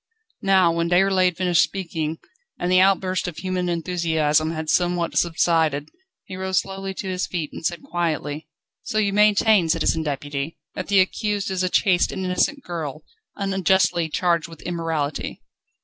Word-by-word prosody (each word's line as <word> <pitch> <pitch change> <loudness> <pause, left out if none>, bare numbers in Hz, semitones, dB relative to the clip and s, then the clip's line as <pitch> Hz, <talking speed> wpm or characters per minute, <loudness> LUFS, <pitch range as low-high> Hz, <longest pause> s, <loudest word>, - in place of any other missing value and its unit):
Now, 190 -3 +4
when 170 0 -1
Déroulède 185 -1 +3
finished 180 -3 +3
speaking, 165 -4 -2 0.4
and 175 - -1
the 185 - +6
outburst 185 -1 +2
of 170 -3 -6
human 185 -1 -2
enthusiasm 160 -3 +1
had 160 -1 -4
somewhat 175 +1 +1
subsided, 160 -3 +1 0.4
he 185 - -8
rose 190 0 -2
slowly 195 0 -2
to 195 - -5
his 185 0 -2
feet, 165 -4 -4
and - - -8
said 170 +1 -2
quietly: 155 -3 -3 0.3
"So 215 - -4
you 205 -2 +1
maintain, 210 -3 +4
Citizen 160 0 +1
Deputy, 145 0 -4 0.2
that 185 - -5
the 200 -2 +5
accused 205 +1 -1
is 185 -1 -1
a 185 - +1
chaste 180 -1 +2
and 190 -1 -4
innocent 270 +10 0
girl, 155 -4 -5 0.3
unjustly 190 -4 +1
charged 170 0 +1
with 165 -1 -13
immorality?" 165 -4 -3
175 Hz, 155 wpm, -23 LUFS, 160-190 Hz, 0.4 s, the